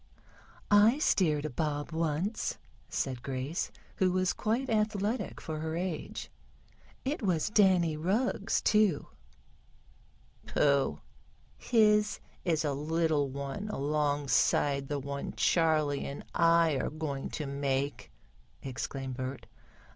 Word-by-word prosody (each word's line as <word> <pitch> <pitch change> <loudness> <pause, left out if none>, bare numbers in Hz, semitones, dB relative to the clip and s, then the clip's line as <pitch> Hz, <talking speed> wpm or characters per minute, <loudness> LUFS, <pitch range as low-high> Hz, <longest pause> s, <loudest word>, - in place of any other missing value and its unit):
"I 210 +5 +6
steered 155 - +2
a - - -1
bob 145 +2 -2
once," 165 +6 -1 0.3
said 130 -3 -2
Grace, 135 +5 -3 0.3
who 185 -1 +3
was 185 0 +1
quite 235 +5 -1
athletic 215 0 -1
for 155 -1 -5
her 160 +1 -3
age. 175 -2 -4 0.7
"It 280 +3 -1
was 185 -2 0
Danny 185 -6 +4
Rugg's, 200 +6 0
too." 210 -8 +3 1.4
"Pooh! 140 -2 +2 0.5
His 210 -2 +3 0.2
is 160 -3 +1
a 145 - 0
little 155 0 +1
one 140 +9 -5
alongside 145 - +1
the 145 - -2
one 140 0 -5
Charley 155 -4 +2
and 140 - -7
I 165 -3 +4
are - - -1
going 145 -3 -4
to 150 - -3
make!" 140 0 -2 0.5
exclaimed 130 0 -4
Bert. 130 +1 -5
155 Hz, 110 wpm, -30 LUFS, 140-190 Hz, 1.4 s, I